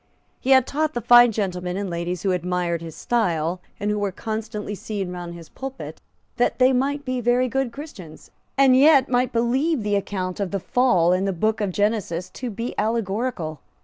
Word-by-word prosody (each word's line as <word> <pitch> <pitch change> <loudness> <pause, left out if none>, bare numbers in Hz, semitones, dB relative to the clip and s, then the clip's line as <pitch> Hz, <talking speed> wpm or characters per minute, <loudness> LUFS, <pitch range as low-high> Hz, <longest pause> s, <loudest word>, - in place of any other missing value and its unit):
He 260 - -4
had 260 -2 +6
taught 310 +3 -1
the - - 0
fine 240 +1 +7
gentlemen 180 -4 -3
and 200 0 -2
ladies 170 0 -3
who 195 - +1
admired 180 -1 -1
his 165 -1 -8
style, 180 -7 0 0.2
and 205 +1 -1
who 210 - -1
were 200 -1 -1
constantly 215 0 -5
seen 200 -2 -4
round 175 -1 -6
his 165 -2 -11
pulpit, 270 0 -8 0.4
that 245 - +1
they 260 +1 +5
might 280 +3 0
be 255 -1 -2
very 245 +2 +2
good 265 0 -1
Christians, 225 - -11 0.3
and 270 -2 +6
yet 280 0 +6
might 250 0 +1
believe 255 +4 +1
the 205 0 0
account 190 -2 -3
of 200 -2 -1
the 195 - -2
Fall 185 -6 +3
in 185 +1 +1
the 195 - +1
book 215 +5 0
of 205 - 0
Genesis 205 -4 -1
to 250 - -5
be 230 +3 -4
allegorical. 215 - -2
210 Hz, 190 wpm, -23 LUFS, 180-250 Hz, 0.4 s, fine